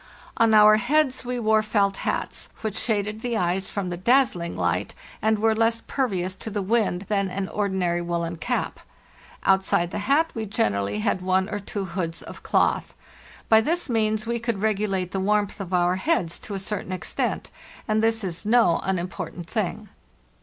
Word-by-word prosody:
On 225 -1 +4
our 215 0 +8
heads 260 +2 +1
we 250 0 -3
wore 220 -2 +3
felt 200 -2 +1
hats, - - -3
which 215 -2 -3
shaded 210 -1 -1
the 240 -2 -1
eyes 185 +1 0
from 190 -3 -3
the 175 - -3
dazzling 200 -5 +2
light, - - -1 0.3
and 220 0 +2
were 220 +1 +3
less 225 +1 +2
pervious 190 -9 -1
to 220 - -5
the 205 -2 -2
wind 205 -3 +1
than 200 -2 0
an 190 +1 -3
ordinary 190 -4 0
woollen 170 -1 -2
cap. 245 +8 -2 0.6
Outside 190 -2 +2
the - - -3
hat 320 +4 +3
we 220 -1 -4
generally 105 - 0
had 185 - 0
one 185 +1 +1
or 205 - -3
two 200 0 -4
hoods 170 -3 -4
of - - -10
cloth. - - +1 0.5
By 220 0 +6
this 335 +6 -1
means 215 -1 +1
we 235 +1 -1
could 225 -3 -2
regulate 195 -4 0
the 195 - -2
warmth 205 +1 0
of 190 -2 -6
our 180 0 +2
heads 190 - 0
to 205 - -6
a - - -3
certain 195 -1 -4
extent, 185 -1 -2 0.4
and 215 -1 +2
this 225 -1 +1
is 180 0 -3
no 220 -5 +4
unimportant 180 -2 -4
thing. 215 0 -2
205 Hz, 175 wpm, -24 LUFS, 185-225 Hz, 0.6 s, our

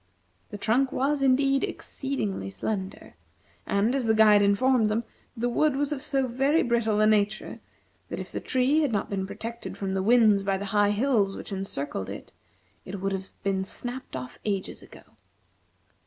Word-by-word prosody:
The - - -7
trunk 245 +6 +1
was, 280 +2 0
indeed, 275 +1 +3
exceedingly 215 - -3
slender, 190 - -5 0.5
and, 205 +5 +2
as 270 -3 0
the 220 - +4
guide 210 -1 +6
informed 220 +3 +3
them, 220 +2 0 0.3
the 240 +2 0
wood 285 +4 +2
was 285 +1 -1
of 285 -3 -3
so 275 -2 0
very 270 +6 +2
brittle 230 -3 +1
a 215 - +5
nature 215 0 +1 0.5
that - - -4
if - - -7
the - - -3
tree 260 +4 +2
had 295 -5 +1
not 205 -2 -2
been 190 -1 -2
protected 235 +3 -7
from 195 -1 -3
the 190 - 0
winds 215 -1 +5
by 195 0 0
the 200 - -5
high 205 -1 +4
hills 210 -3 +1
which - - -8
encircled 145 - -4
it, - - -8 0.5
it 190 +1 -7
would 195 +1 -1
have 190 0 -4
been 195 -1 0
snapped 245 - -5
off 125 -1 -7
ages 200 -3 -3
ago. - - -15
215 Hz, 175 wpm, -27 LUFS, 195-260 Hz, 0.5 s, guide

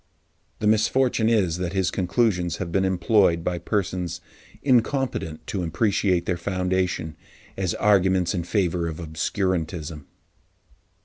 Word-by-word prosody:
The - - -4
misfortune 110 +2 +2
is 95 -7 +1
that 90 -1 -3
his 95 -1 +1
conclusions 90 -3 0
have 85 -3 -4
been 95 +2 +2
employed 95 -2 +2
by 90 0 -1
persons 90 -2 -2 0.4
incompetent 125 - 0
to 100 - -3
appreciate 95 +1 +1
their 90 - -1
foundation, 90 -2 -1 0.4
as 95 -3 -1
arguments 95 -3 +3
in 90 -3 -2
favour 90 -2 0
of 80 -1 -5
obscurantism. 80 -2 -2
90 Hz, 120 wpm, -24 LUFS, 85-100 Hz, 0.4 s, arguments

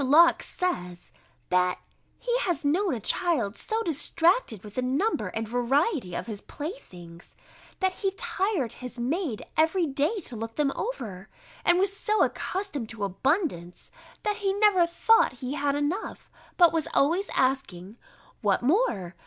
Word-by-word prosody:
Locke 320 +6 +6
says, 180 - -3 0.4
that 180 0 +2 0.4
he 485 -1 -1
has 350 -9 -1
known 345 +2 +2
a - - -4
child 240 - 0
so 445 +1 -2
distracted 330 - +1
with 210 -1 -10
the 255 - -1
number 275 - 0
and 225 0 -4
variety 245 - 0
of - - -3
his 210 -3 -6
playthings, 180 - -9 0.5
that 375 0 +3
he 390 +1 -1
tired 370 - -1
his 250 -1 -8
maid 260 - -2
every 325 +3 +3
day 295 +9 0
to 250 - -3
look 225 +1 -6
them 290 -2 +1
over: 215 - -5 0.3
and 350 - +4
was 390 +1 +1
so 425 +1 +2
accustomed 365 - -3
to 220 -3 -6
abundance, 195 - -1 0.3
that 420 0 0
he 395 -2 0
never 400 -4 +4
thought 345 - +4
he 255 +2 -5
had 290 -1 0
enough, 295 +9 -3 0.3
but 345 -2 +6
was 320 -3 0
always 340 +8 +2
asking, 220 -8 -1 0.5
"What 200 +1 +1
more? 245 - +1
290 Hz, 150 wpm, -27 LUFS, 225-370 Hz, 0.5 s, Locke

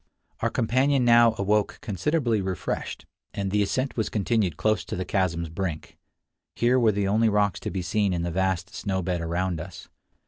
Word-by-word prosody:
Our - - +1
companion 130 +3 +2
now 115 -1 +6
awoke 105 +1 +1
considerably 115 - 0
refreshed, 95 -2 -4 0.3
and 100 -1 -2
the 105 +1 +2
ascent 130 +6 -1
was 110 - -1
continued 105 -3 0
close 110 0 +1
to - - -5
the 95 - -3
chasm's 85 -4 -1
brink. 85 -1 -5 0.6
Here 125 +2 +3
were 115 -3 +4
the 100 -1 -1
only 110 +3 +3
rocks 100 -3 +1
to - - -4
be 95 -2 -3
seen 100 +3 +1
in 85 -2 -1
the 85 - -2
vast 95 +2 -1
snow 95 -3 -2
bed 90 -1 -1
around 85 +1 -1
us. 85 -1 -10
100 Hz, 180 wpm, -26 LUFS, 90-110 Hz, 0.6 s, now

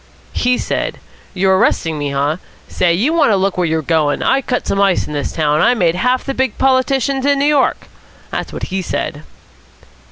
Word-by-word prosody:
"He 250 0 +1
said, - - -3 0.4
'You're 190 0 +3
arresting 160 -4 +1
me, 145 -1 -2
huh? 140 +3 0 0.3
Say, 175 - +1
you 225 - +1
want 310 -6 +3
to 210 - +3
look 195 0 0
where 180 -2 0
you're 160 0 -1
goin'; 155 -2 +1
I 270 - +2
cut 250 -1 -2
some 200 - 0
ice 195 -2 +2
in - - -7
this 145 -1 -2
town. 150 -1 +1
I 250 - +4
made 175 -7 +2
half 250 +8 0
the 275 - -3
big 260 -4 -1
politicians 265 0 +1
in 285 0 +2
New 280 - +1
York!' 295 -2 +1 0.5
That - - -3
was - - -14
what - - -7
he 190 - 0
said." 150 -4 -4
195 Hz, 210 wpm, -16 LUFS, 160-265 Hz, 0.5 s, I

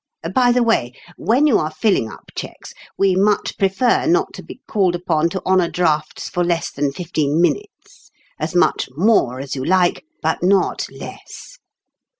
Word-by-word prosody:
By 250 -2 +4
the 245 0 +3
way, 175 - +1 0.2
when 250 +7 +2
you 280 -8 +4
are 155 - -1
filling 155 - 0
up - - -14
cheques, - - -8 0.2
we 195 -2 +3
much 205 +2 +1
prefer 195 - +2
not 360 +4 +1
to - - -8
be - - -12
called 190 -4 +1
upon 170 -2 0
to 185 +1 -5
honor 185 -2 +3
drafts 155 -4 -1
for 175 - -1
less 170 -1 -1
than 140 0 -1
fifteen 155 -2 -1
minutes; 410 - -3 0.3
as - - -4
much 175 -6 +2
more 165 - +2
as 135 +1 -5
you 130 - -4
like, 180 - +2 0.2
but - - -1
not 190 +2 +1
less. - - -11
180 Hz, 165 wpm, -19 LUFS, 155-215 Hz, 0.3 s, By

